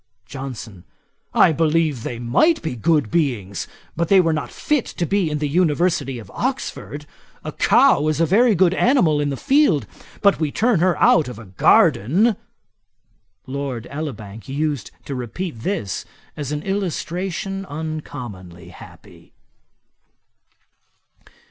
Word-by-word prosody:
JOHNSON. 120 Hz, -7 st, -8 dB, 0.5 s
'I -, -, +6 dB
believe 155 Hz, -4 st, +1 dB
they 120 Hz, -, -5 dB
might 125 Hz, -, +2 dB
be 160 Hz, -6 st, -3 dB
good 150 Hz, -2 st, +1 dB
beings; 120 Hz, -, -1 dB, 0.3 s
but 170 Hz, +1 st, 0 dB
they 195 Hz, +2 st, +6 dB
were 165 Hz, -3 st, +3 dB
not 155 Hz, -, -3 dB
fit 295 Hz, -5 st, -1 dB
to 170 Hz, -, -3 dB
be 195 Hz, -1 st, +1 dB
in 150 Hz, -, -2 dB
the 150 Hz, 0 st, -1 dB
University 160 Hz, -3 st, +1 dB
of 115 Hz, -, -11 dB
Oxford. 245 Hz, -, -4 dB, 0.4 s
A -, -, -5 dB
cow 145 Hz, +2 st, +4 dB
is 155 Hz, 0 st, 0 dB
a 165 Hz, -, +4 dB
very 220 Hz, +6 st, +4 dB
good 185 Hz, 0 st, +4 dB
animal 185 Hz, -, +3 dB
in 145 Hz, -, 0 dB
the 135 Hz, -, -3 dB
field; 265 Hz, -, +3 dB, 0.4 s
but 200 Hz, -4 st, +4 dB
we 155 Hz, -3 st, -1 dB
turn 225 Hz, 0 st, +2 dB
her 175 Hz, -1 st, +2 dB
out 155 Hz, -, +4 dB
of 125 Hz, -3 st, -7 dB
a 115 Hz, -, -10 dB
garden.' 150 Hz, -, +3 dB, 1.1 s
Lord 130 Hz, -3 st, -4 dB
Elibank 115 Hz, -8 st, -7 dB
used 145 Hz, -4 st, -2 dB, 0.2 s
to 140 Hz, -, -5 dB
repeat 130 Hz, -, -5 dB
this 115 Hz, -, -3 dB, 0.3 s
as 145 Hz, -2 st, -5 dB
an 150 Hz, 0 st, -3 dB
illustration 195 Hz, 0 st, -3 dB
uncommonly 120 Hz, -, -7 dB
happy. 90 Hz, -, -15 dB
150 Hz, 135 wpm, -21 LUFS, 125-180 Hz, 1.1 s, I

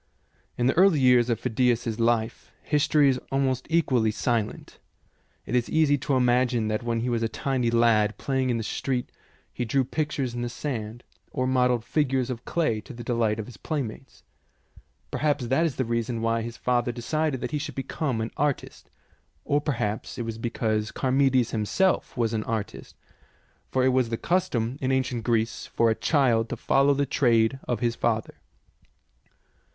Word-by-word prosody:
Of 120 Hz, -, 0 dB
the 130 Hz, -, +3 dB
early 185 Hz, -3 st, +5 dB
years 125 Hz, -2 st, +4 dB
of 115 Hz, -2 st, 0 dB
Phidias 125 Hz, -1 st, +1 dB
's 115 Hz, -1 st, -3 dB
life, 115 Hz, -1 st, 0 dB
history 150 Hz, 0 st, +3 dB
is 130 Hz, -1 st, +1 dB
almost 135 Hz, -2 st, 0 dB
equally 130 Hz, -9 st, +2 dB
silent. 110 Hz, 0 st, -2 dB, 0.7 s
It 120 Hz, -, -2 dB
is 120 Hz, -1 st, +1 dB
easy 155 Hz, -2 st, +3 dB
to 135 Hz, +1 st, 0 dB
imagine 125 Hz, -2 st, +2 dB
that 110 Hz, 0 st, -1 dB
when 115 Hz, -1 st, -1 dB
he 125 Hz, -, -1 dB
was 120 Hz, -1 st, 0 dB
a 115 Hz, -, 0 dB
tiny 125 Hz, 0 st, -1 dB
lad, 115 Hz, -2 st, +3 dB
playing 130 Hz, -2 st, -1 dB
in 120 Hz, -, +1 dB
the 115 Hz, -, -3 dB
street, 125 Hz, +3 st, -2 dB, 0.4 s
he 125 Hz, -, -3 dB
drew 130 Hz, +4 st, +1 dB
pictures 140 Hz, -3 st, -2 dB
in 120 Hz, -, -4 dB
the 120 Hz, -, -2 dB
sand, 120 Hz, -3 st, -5 dB, 0.3 s
or 130 Hz, -, -2 dB
modelled 125 Hz, -2 st, +2 dB
figures 135 Hz, -4 st, 0 dB
of 120 Hz, -1 st, -7 dB
clay 135 Hz, -11 st, 0 dB
to 130 Hz, -, -11 dB
the 120 Hz, 0 st, -8 dB
delight 115 Hz, -3 st, 0 dB
of 110 Hz, -, -4 dB
his 125 Hz, -, -12 dB
playmates. 135 Hz, -4 st, -5 dB, 0.9 s
Perhaps 145 Hz, -4 st, 0 dB
that 160 Hz, +6 st, +3 dB
is 150 Hz, -, -5 dB
the 130 Hz, -, -1 dB
reason 115 Hz, 0 st, -2 dB
why 115 Hz, 0 st, +1 dB
his 115 Hz, 0 st, -6 dB
father 120 Hz, -1 st, 0 dB
decided 140 Hz, +4 st, -1 dB
that -, -, -3 dB
he 150 Hz, -, -1 dB
should 160 Hz, -, -6 dB
become 135 Hz, -3 st, -2 dB
an 110 Hz, -, -3 dB
artist, 145 Hz, -1 st, -2 dB, 0.6 s
or 145 Hz, +1 st, +1 dB
perhaps 110 Hz, -8 st, -3 dB
it 120 Hz, -, -3 dB
was 115 Hz, 0 st, -5 dB
be 120 Hz, -, -2 dB
cause 110 Hz, -2 st, -1 dB
Charmides 130 Hz, -2 st, +2 dB
himself 125 Hz, -, 0 dB
was 115 Hz, -2 st, 0 dB
an 110 Hz, -1 st, -1 dB
artist, 110 Hz, -3 st, -5 dB, 0.7 s
for 130 Hz, -1 st, +1 dB
it -, -, +5 dB
was 130 Hz, -2 st, +2 dB
the 115 Hz, -, -2 dB
custom 130 Hz, -8 st, -1 dB
in 130 Hz, 0 st, 0 dB
ancient 130 Hz, -3 st, 0 dB
Greece 115 Hz, 0 st, 0 dB
for 115 Hz, -1 st, +2 dB
a -, -, +3 dB
child 120 Hz, -4 st, +2 dB
to -, -, -4 dB
follow 140 Hz, +1 st, +3 dB
the 140 Hz, +1 st, +1 dB
trade 120 Hz, -2 st, +2 dB
of 120 Hz, -3 st, -1 dB
his 120 Hz, -1 st, +1 dB
father. 110 Hz, -2 st, -1 dB
125 Hz, 180 wpm, -26 LUFS, 115-135 Hz, 0.9 s, early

